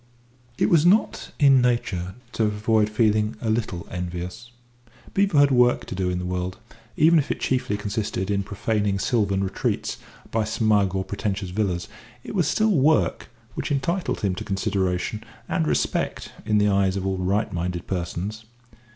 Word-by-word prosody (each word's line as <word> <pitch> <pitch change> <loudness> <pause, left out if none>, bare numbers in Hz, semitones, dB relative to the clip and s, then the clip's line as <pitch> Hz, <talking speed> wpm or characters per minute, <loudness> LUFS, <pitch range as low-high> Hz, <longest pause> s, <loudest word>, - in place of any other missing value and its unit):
It - - +2
was 165 -3 +5
not 190 +6 +2
in 135 -4 +6
Nature 95 -7 -1 0.2
to 115 - 0
avoid 105 +1 +1
feeling 110 0 +1
a 110 -1 -1
little 110 -6 -2
envious. 90 +5 -5 0.6
Beevor 195 -5 +2
had 140 0 +6
work 125 -1 +3
to - - -6
do 95 -1 -1
in 90 - -1
the 90 - -4
world: 90 +1 -3 0.4
even 160 +2 +6
if 140 - -2
it - - -2
chiefly 130 -5 0
consisted 105 -1 -2
in 100 -1 +1
profaning 100 0 -1
sylvan 100 -2 +1
retreats 95 - -2 0.3
by 110 0 +1
smug 105 -3 +1
or 95 - 0
pretentious 100 -1 -3
villas, 90 -4 -1 0.4
it - - -7
was 180 -7 +1
still 215 +7 +2
work 135 - +2 0.2
which - - -4
entitled 170 +7 -1
him 100 -3 +1
to 90 - -5
consideration 95 +1 -1 0.2
and 80 - 0
respect 75 - -1 0.2
in 105 -1 +3
the 105 0 +3
eyes 100 -1 +2
of 95 - -3
all 95 -1 -1
right 95 +4 0
minded 85 0 -3
persons. 95 +4 -4
105 Hz, 165 wpm, -24 LUFS, 95-120 Hz, 0.6 s, in